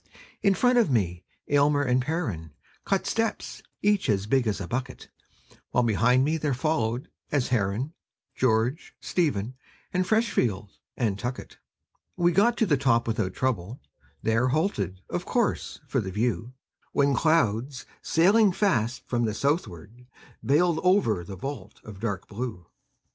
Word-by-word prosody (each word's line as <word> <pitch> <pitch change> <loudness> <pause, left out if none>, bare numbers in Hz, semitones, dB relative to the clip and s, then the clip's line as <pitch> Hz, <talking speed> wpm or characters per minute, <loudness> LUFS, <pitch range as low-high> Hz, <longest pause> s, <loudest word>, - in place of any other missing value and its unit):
In 195 -1 +3
front 245 +2 +4
of 225 - +3
me 90 -8 0 0.2
Almer 145 0 +3
and 125 -1 +2
Perren 110 - -3 0.3
Cut 195 -1 0
steps, 225 0 -2 0.2
each 205 -1 +2
as 100 -2 +1
big 125 +2 +2
as 105 -2 -1
a 95 - -5
bucket; 130 +3 -5 0.6
While 125 - +2
behind 120 +3 +3
me 155 +2 +1
there 150 -4 -1
followed, 125 -4 -1 0.2
as 140 -4 +1
Herren, 120 - 0 0.4
George, 125 +5 0
Stephen, 130 - -1 0.4
and 185 0 +2
Freshfield, 125 - 0 0.3
and 105 -5 0
Tuckett. 125 +2 -5 0.6
We 175 -1 +3
got 230 +7 +3
to 225 - +3
the 150 -7 +2
top 120 -4 +2
without 95 -5 -1
trouble; 120 -2 -2 0.4
There 115 +3 +2
halted, 115 - -1
of - - -4
course, - - -1
for - - 0
the 95 - -5
view; 115 +4 -2 0.4
When 140 0 +3
clouds, 130 -3 +1 0.2
sailing 195 +4 +4
fast 125 - 0
from 120 -1 0
the 110 -1 -2
southward, 120 - -3 0.3
Veiled 160 +4 +2
over 180 - +2
the 95 +3 -8
vault 110 -2 -7
of 105 -3 -10
dark 100 -4 -3
blue. 105 -5 -5
125 Hz, 145 wpm, -26 LUFS, 105-160 Hz, 0.6 s, front